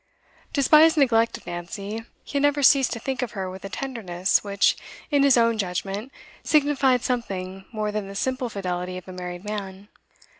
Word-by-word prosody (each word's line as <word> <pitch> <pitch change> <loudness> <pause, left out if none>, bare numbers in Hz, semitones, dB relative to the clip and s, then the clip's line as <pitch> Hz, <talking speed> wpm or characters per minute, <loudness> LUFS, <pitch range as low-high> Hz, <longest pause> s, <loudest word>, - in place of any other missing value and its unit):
Despite 305 +2 +6
his 325 0 +2
neglect 230 -5 +3
of - - -19
Nancy, 195 +5 -6 0.2
he - - -12
had - - +1
never 290 0 +2
ceased 270 -1 +5
to 230 - -5
think 265 +2 -3
of 250 - -3
her 190 -2 -4
with 190 +1 -10
a 195 - -6
tenderness 195 -8 -1
which, 200 -1 +2 0.4
in 285 -1 +4
his 275 -2 +5
own 230 -1 +3
judgment, 195 +5 -3 0.3
signified 280 -4 +3
something 195 -6 -3
more 215 -2 -2
than 210 -2 -3
the 195 - -9
simple 255 +3 -1
fidelity 180 -3 -4
of 185 - -10
a 185 - -8
married 180 0 -6
man. 200 -1 -6
215 Hz, 185 wpm, -24 LUFS, 190-260 Hz, 0.4 s, Despite